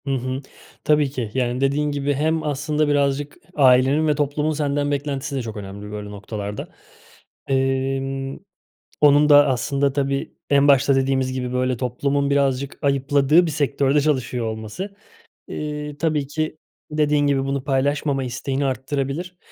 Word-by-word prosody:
Hı - - 0
hı. 130 +1 -3 0.4
Tabii 150 -2 +3
ki, 125 -5 -4
yani 125 0 -1
dediğin 145 +2 +1
gibi 145 0 -1
hem 155 +3 0
aslında 150 +1 0
birazcık 145 0 0 0.2
ailenin 135 +2 +4
ve 150 - +2
toplumun 150 +1 0
senden 145 -1 -1
beklentisi 140 0 -3
de 135 - -1
çok 110 -3 -6
önemli 100 +1 -8
böyle 105 -1 -6
noktalarda. 105 0 -6 0.8
Emm, 135 0 -1 0.6
onun 145 0 +6
da 145 0 +7
aslında 135 +2 0
tabii 140 -1 -1 0.2
en 140 0 +4
başta 140 0 +5
dediğimiz 130 -1 +1
gibi 125 -1 -3
böyle 130 0 0
toplumun 140 +3 -1
birazcık 140 -1 0
ayıpladığı 140 +4 +3
bir 160 - -2
sektörde 140 -1 +1
çalışıyor 130 -5 0
olması, 110 - -5 0.5
eee, 150 -1 -5
tabii 150 -3 0
ki 155 +2 -3 0.3
dediğin 150 -1 +2
gibi 135 -1 +1
bunu 135 -1 -2
paylaşmama 140 0 0
isteğini 135 +2 -2
arttırabilir. 140 +6 -3
140 Hz, 140 wpm, -22 LUFS, 130-145 Hz, 0.8 s, da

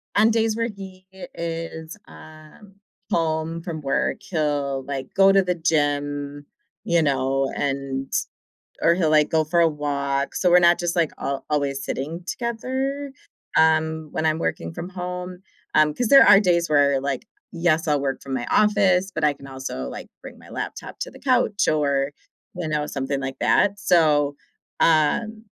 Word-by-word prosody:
on 220 +2 +5
days 225 -1 +1
where 230 0 0
he 190 -3 -10
is, 165 -2 -6
um 155 +6 -15 0.3
home 165 0 -1
from 165 -3 -5
work, 135 -2 0
he'll, 145 -5 -2
like, 135 -2 -5
go 195 0 +6
to 195 0 +5
the 180 -1 -1
gym, 145 -3 -1 0.4
you 170 -1 +2
know, 135 -2 0
and 135 -1 -3 0.7
or 170 - +4
he'll, 170 -3 +1
like, 150 -1 +4
go 160 -1 +2
for 165 +3 0
a 170 - +5
walk. 140 -2 -2
So 180 - +1
we're 175 - +7
not 175 0 +4
just, 175 0 -1
like, 170 -3 +1
al 140 -1 -3
always 140 -2 -1
sitting 165 +6 -4
together, 260 +6 -3 0.5
um, 160 0 +2
when 160 - -2
I'm 155 0 +1
working 165 - -3
from 175 +1 -6
home, 180 0 -6 0.4
um 155 -1 +4
'cause 245 +9 -1
there 275 +4 +8
are 200 - +8
days 170 -4 +1
where, 140 -2 +4
like, 140 -1 -3 0.2
yes, 165 -1 +1
I'll 145 -2 +2
work 135 -1 -2
from 135 - -6
my 125 -2 -2
office, 195 -3 +3
but 155 - -3
I 150 - +3
can 140 -1 -15
also, 130 - -6
like, - - -8 0.2
bring - - -11
my - - -16
laptop - - -6
to - - -4
the - - -14
couch 200 - +1
or, 140 -2 +1 0.4
you 175 -2 -4
know, 150 -1 -1
something 135 0 -3
like 135 -1 -5
that, 200 0 +3
so, 150 -6 +3 0.4
um 215 +8 +2
160 Hz, 170 wpm, -23 LUFS, 145-180 Hz, 0.7 s, there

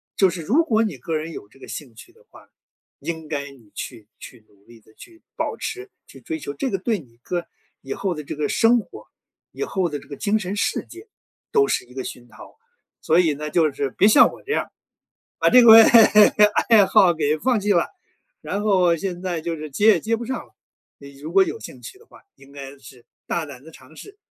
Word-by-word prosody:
就 190 -2 +4
是 170 -2 -6
如 280 - +2
果 225 -7 +1
你 205 -10 -3
个 160 +6 -4
人 155 +2 -4
有 100 - -10
这 135 - -22
个 - - -13
兴 130 -7 -9
趣 - - -15
的 - - -25
话， - - -18 0.5
应 160 +1 -6
该 145 -2 -4
你 120 -7 -19
去 115 -5 -8
去 115 -4 -13
努 100 -1 -29
力 115 -1 -17
地 110 0 -25
去 335 - -17
保 - - -3
持、 390 +2 -6 0.2
去 135 - -16
追 160 +6 -5
求， 140 -1 -7
这 255 - -3
个 195 - -2
对 210 +2 -2
你 120 -6 -19
个 175 -1 -4 0.3
以 135 - -6
后 190 -2 -2
的 150 -2 -7
这 140 - -7
个 150 -1 -2
生 235 +1 +3
活， - - -12 0.4
以 - - -5
后 190 - -2
的 150 - -4
这 - - -18
个 140 - -8
精 215 +5 0
神 195 0 -4
世 - - -2
界 370 +6 -14 0.4
都 420 -2 +3
是 - - -1
一 125 +1 -19
个 130 - -4
熏 120 -1 -9
陶。 120 - -16 0.4
所 165 +3 +2
以 160 -4 +2
呢， 150 +1 -6
就 160 -2 +2
是 140 0 -3
别 200 - +2
像 215 - +6
我 - - -14
这 420 - -3
样， - - -2 0.7
把 - - +3
这 250 - +7
个 230 -2 +8 1.0
爱 215 -4 +6
好 180 -3 +4
给 155 -1 0
放 245 +6 0
弃 205 0 0
了， 170 - +1 0.5
然 200 +1 -4
后 185 -5 +2
现 180 0 -5
在 180 -3 -3
就 165 0 -4
是 155 -2 -9
接 205 +9 +2
也 220 - +6
接 225 +1 -2
不 235 - -7
上 260 - -4
了。 - - -30 0.4
你 140 -1 -14
如 155 +4 -8
果 195 0 +5
有 450 - -3
兴 - - -12
趣 385 - -11
的 460 - -22
话 - - -19 0.2
应 135 0 -19
该 140 0 -10
是 130 -3 -16 0.2
“大 170 -2 -2
胆 140 -2 -12
地 160 - -14
尝 145 +3 -18
试， 405 0 -13
165 Hz, 250 characters per minute, -22 LUFS, 140-210 Hz, 1.0 s, 个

